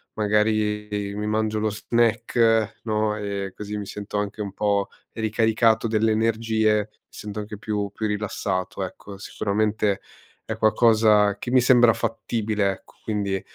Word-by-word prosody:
magari, 105 Hz, 0 st, +1 dB
ehm, 100 Hz, -1 st, -3 dB
mi 105 Hz, 0 st, -2 dB
mangio 110 Hz, 0 st, 0 dB
lo 110 Hz, -, +1 dB
snack 115 Hz, 0 st, +1 dB
no, 110 Hz, -1 st, 0 dB
e 100 Hz, -2 st, -4 dB
così 105 Hz, 0 st, -5 dB
mi 105 Hz, -, -5 dB
sento 105 Hz, +1 st, -5 dB
anche 105 Hz, +1 st, -3 dB
un 100 Hz, -2 st, -4 dB
po' 100 Hz, 0 st, 0 dB, 0.2 s
ricaricato 110 Hz, 0 st, +2 dB
delle 110 Hz, 0 st, +2 dB
energie, 110 Hz, -1 st, +2 dB, 0.2 s
mi -, -, -40 dB
sento 105 Hz, 0 st, -6 dB
anche 105 Hz, 0 st, -6 dB
più 105 Hz, -1 st, -2 dB
più 110 Hz, -, -3 dB
rilassato. 100 Hz, -2 st, -2 dB
Ecco, 100 Hz, +2 st, -8 dB
sicuramente, 105 Hz, 0 st, -1 dB, 0.5 s
è -, -, -3 dB
qualcosa 110 Hz, -2 st, +4 dB
che 120 Hz, -, -5 dB
mi 130 Hz, -, +6 dB
sembra 120 Hz, -2 st, +6 dB
fattibile, 110 Hz, -3 st, -1 dB
ecco. -, -, -12 dB
Quindi 100 Hz, -3 st, -1 dB
105 Hz, 145 wpm, -24 LUFS, 105-110 Hz, 0.5 s, mi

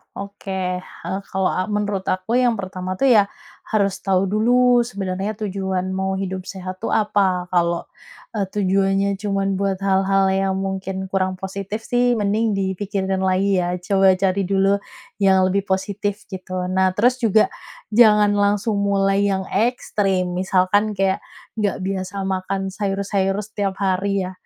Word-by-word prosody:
Oke 190 Hz, -2 st, -4 dB
hal 190 Hz, +1 st, -6 dB
kalau, 190 Hz, -1 st, 0 dB
eee, 185 Hz, -, -1 dB
menurut 205 Hz, -2 st, -2 dB
aku 185 Hz, +7 st, 0 dB
yang 245 Hz, -2 st, +3 dB
pertama 185 Hz, -1 st, -5 dB
tuh 270 Hz, +6 st, +2 dB
ya 205 Hz, -3 st, +5 dB, 0.4 s
harus 200 Hz, -3 st, 0 dB
tahu 190 Hz, -1 st, +1 dB
dulu 245 Hz, +3 st, +4 dB
sebenarnya 200 Hz, -3 st, -3 dB
tujuan 190 Hz, -2 st, -2 dB
mau 190 Hz, 0 st, -1 dB
hidup 190 Hz, -1 st, -4 dB
sehat 185 Hz, -1 st, -7 dB
tuh -, -, -4 dB
apa, 190 Hz, -4 st, +1 dB
kalau, 170 Hz, -1 st, +1 dB, 0.5 s
eee, 200 Hz, -3 st, -1 dB
tujuannya 195 Hz, 0 st, +1 dB
cuman 195 Hz, -2 st, -1 dB
buat 195 Hz, -1 st, 0 dB
hal-hal 195 Hz, 0 st, +2 dB
yang 195 Hz, 0 st, +1 dB
mungkin 190 Hz, 0 st, -3 dB
kurang 185 Hz, -1 st, 0 dB
positif 195 Hz, +3 st, -5 dB
sih 245 Hz, 0 st, +2 dB
mending 210 Hz, +1 st, +1 dB
dipikirkan 190 Hz, 0 st, -2 dB
lagi 190 Hz, 0 st, +2 dB
ya, 175 Hz, +1 st, -1 dB
coba 195 Hz, -1 st, +4 dB
cari 195 Hz, +1 st, +1 dB
dulu 195 Hz, +1 st, +2 dB, 0.4 s
yang 190 Hz, -1 st, +5 dB
lebih 200 Hz, +1 st, -1 dB
positif 200 Hz, +2 st, -2 dB
gitu. 185 Hz, -1 st, -4 dB
Nah, 185 Hz, 0 st, +2 dB
terus 250 Hz, +4 st, +3 dB
juga 220 Hz, -1 st, +3 dB, 0.4 s
jangan 210 Hz, -2 st, +6 dB
langsung 205 Hz, +1 st, +1 dB
mulai 200 Hz, 0 st, +2 dB
yang 190 Hz, -1 st, 0 dB
ekstrim, 195 Hz, -4 st, 0 dB
misalkan 190 Hz, +3 st, +1 dB
kayak 195 Hz, 0 st, +1 dB, 0.4 s
nggak 205 Hz, -2 st, 0 dB
biasa 195 Hz, 0 st, -3 dB
makan 190 Hz, 0 st, -2 dB
sayur-sayur 195 Hz, -1 st, -1 dB
setiap 200 Hz, -2 st, -3 dB
hari 195 Hz, +1 st, +1 dB
ya, 185 Hz, -, -5 dB
195 Hz, 145 wpm, -21 LUFS, 190-205 Hz, 0.5 s, jangan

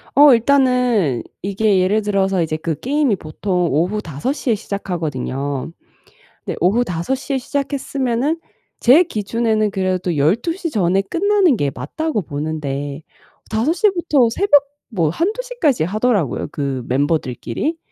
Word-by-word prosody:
어 285 Hz, 0 st, +8 dB
일단은 245 Hz, -, +2 dB, 0.2 s
이게 200 Hz, 0 st, +1 dB
예를 195 Hz, +4 st, +2 dB
들어서 195 Hz, -3 st, +1 dB
이제 155 Hz, -1 st, -1 dB
그 160 Hz, 0 st, -3 dB
게임이 280 Hz, -3 st, +1 dB
보통 180 Hz, +3 st, -2 dB
오후 180 Hz, +9 st, 0 dB
5 160 Hz, -, -3 dB
시에 255 Hz, -6 st, 0 dB
시작하거든요. 150 Hz, -9 st, -4 dB, 0.7 s
근데 -, -, -4 dB
오후 205 Hz, +8 st, +3 dB
5 175 Hz, +6 st, -2 dB
시에 270 Hz, +1 st, -3 dB
시작했으면은 275 Hz, +1 st, -1 dB, 0.4 s
제 275 Hz, +9 st, +6 dB
기준에는 220 Hz, -, 0 dB
그래도 185 Hz, -3 st, -1 dB
12 190 Hz, -, +2 dB
시 345 Hz, -2 st, -4 dB
전에 195 Hz, -, +1 dB
끝나는 370 Hz, -, +2 dB
게 145 Hz, -8 st, 0 dB
맞다고 315 Hz, -, -3 dB
보는데 145 Hz, -1 st, -4 dB, 0.5 s
5 225 Hz, +9 st, +1 dB
시부터 340 Hz, -, +2 dB
새벽 290 Hz, -, +4 dB, 0.3 s
뭐 175 Hz, -9 st, 0 dB
1-2 365 Hz, -, -1 dB
시까지 405 Hz, -, 0 dB
하더라고요, 205 Hz, -, 0 dB
그 140 Hz, -3 st, -3 dB
멤버들끼리. 145 Hz, -, -1 dB
210 Hz, 275 characters per minute, -19 LUFS, 165-275 Hz, 0.7 s, 어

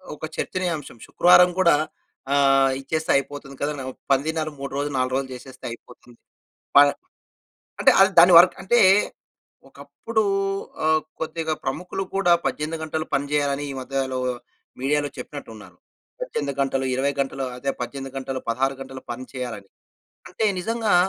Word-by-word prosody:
ఒక 155 Hz, -, -6 dB
చర్చనీయాంశం, 170 Hz, -9 st, -3 dB
శుక్రవారం 180 Hz, 0 st, +6 dB
కూడా 170 Hz, -4 st, +5 dB, 0.6 s
ఆహ్, 135 Hz, -1 st, +4 dB
ఇచ్చేస్తే 155 Hz, +3 st, -2 dB
అయిపోతుంది 140 Hz, 0 st, -6 dB
కదనో, 145 Hz, -2 st, -2 dB, 0.3 s
పనిదినాలు 155 Hz, +3 st, 0 dB
3 140 Hz, 0 st, -5 dB
రోజులు, 145 Hz, 0 st, -2 dB
4 130 Hz, 0 st, 0 dB
రోజులు 135 Hz, -1 st, -2 dB
జేసేస్తే 130 Hz, +1 st, -11 dB
అయిపోతుంది. 120 Hz, 0 st, -14 dB, 0.6 s
ప -, -, +11 dB, 1.0 s
అంటే, -, -, +6 dB
అది 195 Hz, -, +6 dB
దాని 175 Hz, +2 st, +8 dB
వర్క్ 180 Hz, +1 st, +6 dB
అంటే, 240 Hz, +5 st, +3 dB, 0.9 s
ఒకప్పుడు 225 Hz, -1 st, -3 dB, 0.6 s
ఆహ్, 155 Hz, 0 st, +3 dB, 0.2 s
కొద్దిగా 160 Hz, 0 st, -2 dB
ప్రముఖులు 180 Hz, +8 st, -3 dB
కూడా 180 Hz, -3 st, +3 dB
18 155 Hz, +2 st, -2 dB
గంటలు 155 Hz, 0 st, -3 dB
పని 140 Hz, +1 st, 0 dB
చేయాలని 145 Hz, -1 st, 0 dB
ఈ -, -, -4 dB
మధ్యలో 130 Hz, 0 st, -2 dB, 0.6 s
మీడియాలో 145 Hz, +2 st, +1 dB
చెప్పినట్టున్నారు. 115 Hz, -7 st, -9 dB, 0.4 s
18 145 Hz, -, -3 dB
గంటలు 135 Hz, -1 st, 0 dB
20 140 Hz, +2 st, 0 dB
గంటలు 135 Hz, 0 st, -2 dB
అదే, 135 Hz, +2 st, -2 dB
18 135 Hz, +2 st, -5 dB
గంటలు 130 Hz, -1 st, -4 dB
16 135 Hz, +4 st, 0 dB
గంటలు 130 Hz, 0 st, -10 dB
పని 130 Hz, +2 st, -7 dB
చేయాలని. 120 Hz, -6 st, -6 dB, 0.6 s
అంటే 220 Hz, -, -1 dB
నిజంగా, 225 Hz, 0 st, 0 dB
140 Hz, 135 wpm, -23 LUFS, 135-160 Hz, 1.0 s, ప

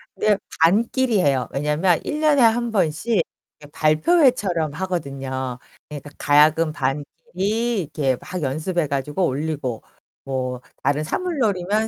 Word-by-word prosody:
네, 210 Hz, -2 st, +2 dB, 0.2 s
반끼리 225 Hz, +6 st, +3 dB
해요. 135 Hz, -7 st, +1 dB
왜냐면 150 Hz, +5 st, +1 dB
1 300 Hz, -, -3 dB
년에 300 Hz, -3 st, +4 dB
1 235 Hz, 0 st, +3 dB
번씩 190 Hz, +2 st, +1 dB, 0.4 s
이렇게 145 Hz, 0 st, -15 dB
발표회처럼 170 Hz, -, +2 dB
하거든요. 135 Hz, -8 st, -4 dB, 0.3 s
그러니까 145 Hz, -1 st, -8 dB
가야금 155 Hz, +2 st, +4 dB
반끼리 185 Hz, -, -2 dB
이렇게 140 Hz, -4 st, -1 dB
막 185 Hz, -1 st, -6 dB
연습해 155 Hz, +4 st, -1 dB
가지고 145 Hz, +6 st, -1 dB
올리고. 140 Hz, -5 st, -3 dB, 0.4 s
뭐 130 Hz, -2 st, -3 dB, 0.2 s
다른 145 Hz, +2 st, +1 dB
사물놀이면 215 Hz, -, 0 dB
160 Hz, 285 characters per minute, -22 LUFS, 145-210 Hz, 0.4 s, 년에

